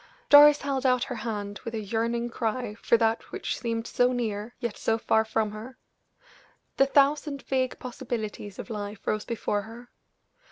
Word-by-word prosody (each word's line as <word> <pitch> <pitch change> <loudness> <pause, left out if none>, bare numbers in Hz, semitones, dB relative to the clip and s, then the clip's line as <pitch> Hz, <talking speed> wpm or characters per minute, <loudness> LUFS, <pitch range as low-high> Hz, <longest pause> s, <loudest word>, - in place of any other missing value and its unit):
Doris 290 0 +9
held 275 -2 -2
out 255 -2 +3
her 260 - -4
hands 205 -3 -5
with 230 -2 -5
a - - -2
yearning 230 +3 -1
cry 230 -1 -2
for 235 - +4
that 225 0 0
which - - -3
seemed 230 -1 -2
so 245 +1 +2
near, 225 -2 -3
yet 235 -4 -3
so 225 - 0
far 220 0 +2
from 220 -1 -1
her; 220 +5 -9 1.0
the 275 - +5
thousand 280 0 +2
vague 260 -1 -1
possibilities 230 -5 -5
of - - -7
life 205 -1 -6
rose 215 -1 -1
before 210 -3 -1
her. 230 +3 -12
230 Hz, 165 wpm, -27 LUFS, 215-255 Hz, 1.0 s, Doris